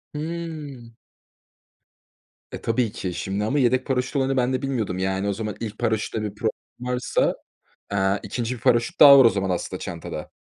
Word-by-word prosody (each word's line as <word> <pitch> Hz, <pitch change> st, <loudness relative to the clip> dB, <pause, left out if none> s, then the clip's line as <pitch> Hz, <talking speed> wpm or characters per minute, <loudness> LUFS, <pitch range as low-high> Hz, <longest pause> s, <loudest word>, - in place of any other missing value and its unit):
Hıı. 150 Hz, -6 st, -6 dB, 1.6 s
Eee, -, -, -6 dB
tabii 115 Hz, -1 st, 0 dB
ki, 95 Hz, -5 st, -4 dB
şimdi 95 Hz, +3 st, -3 dB
ama 135 Hz, +7 st, +1 dB
yedek 130 Hz, 0 st, +2 dB
paraşüt 125 Hz, 0 st, -1 dB
olayını 135 Hz, -1 st, +1 dB
ben 125 Hz, 0 st, +1 dB
de 130 Hz, -, -1 dB
bilmiyordum 120 Hz, -9 st, -2 dB
yani 95 Hz, +1 st, -1 dB
o 100 Hz, -, +1 dB
zaman, 105 Hz, 0 st, -4 dB
ilk 110 Hz, -2 st, -6 dB
paraşütte 110 Hz, -1 st, -1 dB
bir 105 Hz, -1 st, -4 dB
problem 110 Hz, +1 st, 0 dB, 0.4 s
varsa, 125 Hz, 0 st, +1 dB, 0.5 s
aaa, 95 Hz, 0 st, +1 dB
2. 115 Hz, +4 st, -3 dB
bir -, -, -11 dB
paraşüt 120 Hz, -1 st, +2 dB
daha 140 Hz, -2 st, +10 dB
var 130 Hz, -, +7 dB
o -, -, +8 dB
zaman 95 Hz, -3 st, -2 dB
aslında 90 Hz, -, -3 dB
çantada. -, -, -6 dB
115 Hz, 175 wpm, -24 LUFS, 100-130 Hz, 1.6 s, daha